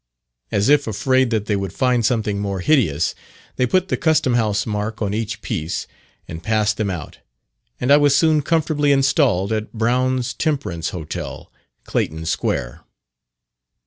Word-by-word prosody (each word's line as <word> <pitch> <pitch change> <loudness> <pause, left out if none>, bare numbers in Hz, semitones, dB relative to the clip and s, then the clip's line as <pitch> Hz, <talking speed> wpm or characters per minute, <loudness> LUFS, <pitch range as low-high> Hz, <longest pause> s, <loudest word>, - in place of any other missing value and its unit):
As 100 +2 +1
if 145 -1 +4
afraid 130 +5 +2
that 110 -3 -1
they 105 - 0
would 100 -2 -3
find 125 -1 +1
something 110 -4 0
more 100 -2 -3
hideous, 90 - +2 0.4
they 125 - +2
put 185 +6 +1
the - - 0
Custom 155 -6 +2
House 110 -4 +1
mark 105 0 -3
on 100 -2 -1
each 110 0 -3
piece, 80 +2 -3 0.4
and 80 -1 -7
passed 110 +1 +1
them 110 -2 -1
out, 85 -7 -6 0.6
and 125 - 0
I 145 - +8
was 145 -1 +4
soon 155 0 +3
comfortably 150 -1 +1
installed 135 - +2
at 110 0 -3
Brown's 125 +2 0
Temperance 120 - -2
Hotel, 80 -4 -6 0.3
Clayton 80 +1 -2
Square. 60 -6 -2
110 Hz, 150 wpm, -20 LUFS, 100-135 Hz, 0.6 s, I